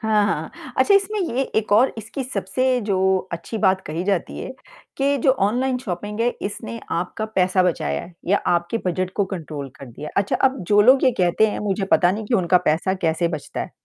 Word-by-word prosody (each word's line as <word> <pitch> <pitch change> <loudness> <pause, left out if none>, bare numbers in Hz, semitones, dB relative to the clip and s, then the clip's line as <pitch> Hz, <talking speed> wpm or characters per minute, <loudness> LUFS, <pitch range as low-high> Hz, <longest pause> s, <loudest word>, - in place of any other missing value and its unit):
हाँ, 215 -1 +2
हाँ। - - -4
अच्छा, 405 - +5
इसमें 400 +2 +2
ये 270 -8 0
एक 215 -2 0
और 235 +6 +5
इसकी 220 +5 -5
सबसे 250 +3 0
जो 190 -1 +1
अच्छी 170 +6 -5
बात 190 -1 +3
कही 160 +3 -3
जाती 195 -3 -1
है, - - -5 0.5
के 280 +1 +2
जो 270 - +6
ऑनलाइन 250 +3 0
शॉपिंग 210 -1 -5
है, 235 - +3
इसने 225 +3 -5
आपका 180 +6 -2
पैसा 185 0 +3
बचाया 75 - 0
है 180 - -12
या 200 +3 +3
आपके 175 +6 +1
बजट 185 +1 -1
को 200 - +2
कंट्रोल 155 -7 -6
कर 135 - -9
दिया 135 +5 -8
है। - - -12
अच्छा, 200 - -1
अब 265 0 +2
जो 205 0 +5
लोग 260 +4 +6
ये - - +6
कहते 180 +4 +3
हैं, - - -4
मुझे 195 -1 -1
पता 175 - +5
नहीं 215 +3 -3
कि 235 - 0
उनका 180 -3 +4
पैसा 175 +5 +1
कैसे 165 +1 +1
बचता 155 -4 -5
है - - -5
195 Hz, 210 wpm, -22 LUFS, 175-230 Hz, 0.5 s, जो